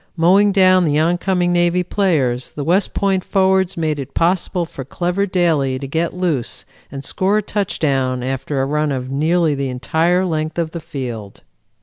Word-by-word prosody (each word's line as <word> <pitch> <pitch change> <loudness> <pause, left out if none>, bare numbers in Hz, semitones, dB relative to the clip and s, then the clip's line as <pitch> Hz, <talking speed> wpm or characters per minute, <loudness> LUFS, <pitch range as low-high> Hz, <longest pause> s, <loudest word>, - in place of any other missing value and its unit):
Mowing 195 +5 +4
down 185 -2 +5
the 150 -3 +1
oncoming 175 +2 +1
Navy 175 +1 +2
players, 150 -11 0
the 145 - -4
West 180 +7 +1
Point 195 -2 +1
forwards 190 -1 +1
made 155 -3 -1
it 135 - -8
possible 175 +1 +1
for 140 -4 -8
clever 180 +8 -2
Daly 160 -8 +1
to 135 - -6
get 165 +5 -2
loose 165 -9 -2 0.3
and 135 0 -6
score 195 +3 +1
a - - +2
touchdown 135 -11 -1
after 135 +1 -2
a - - 0
run 150 +1 0
of 130 -1 -4
nearly 160 +3 +1
the 140 -1 -2
entire 165 +8 +1
length 155 -2 -2
of 165 -2 -1
the 170 - -5
field. 125 -10 -7
165 Hz, 170 wpm, -18 LUFS, 140-180 Hz, 0.3 s, down